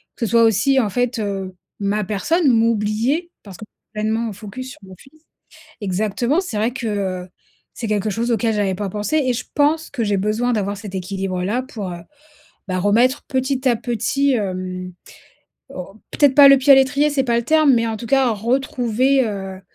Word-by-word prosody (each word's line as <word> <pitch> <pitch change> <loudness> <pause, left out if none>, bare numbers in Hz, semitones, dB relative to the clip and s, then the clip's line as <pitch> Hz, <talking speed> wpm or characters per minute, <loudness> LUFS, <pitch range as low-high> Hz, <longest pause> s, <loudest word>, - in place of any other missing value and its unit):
que 235 - -2
ce - - -4
soit 230 -1 +5
aussi 225 +5 +3
en 220 -5 +1
fait, 245 +3 -1
heu, 195 -3 -4 0.3
ma 205 +1 0
personne, 290 - 0
m'oublier, 230 - +1
parce 195 -4 -11
que 215 - -10 0.3
pleinement 220 +2 -1
focus 225 +6 -8
sur - - -13
mon 190 -1 -12
fils. 310 - -21 0.6
Exactement, 215 - 0
c'est 300 - -5
vrai 220 +3 +1
que, 250 -3 -4
heu, 190 -3 -3 0.5
c'est 235 - -5
quelque 210 0 0
chose 230 +4 -1
auquel 225 0 +1
j'avais 200 -2 0
pas 200 +1 -4
pensé 210 +9 -1
et 255 - +2
je 240 - -4
pense 305 +2 +1
que 250 -5 -2
j'ai 205 -2 0
besoin 215 +5 0
d'avoir 200 -2 -1
cet 200 -2 -8
équilibre-là 190 +3 -2
pour, 215 -8 -6
heu, 175 - -7 0.7
ben 185 0 -1
remettre 235 +9 +2
petit 260 0 0
à 240 - +3
petit, 270 +5 0
hem, 185 -3 -4 0.8
au 185 +2 -9 0.2
peut-être 285 -3 +3
pas 285 -1 +9
le 275 0 +8
pied 270 +2 +4
à - - +8
l'étrier, 270 +3 +3
c'est 285 -2 0
pas 235 -2 +1
le 235 - -1
terme 310 +1 +4
mais 230 -1 +2
en 220 - -3
tout 235 - -8
cas 270 0 +3
retrouver, 250 +3 +1
heu, 195 -2 -6
225 Hz, 190 wpm, -20 LUFS, 200-260 Hz, 0.8 s, pas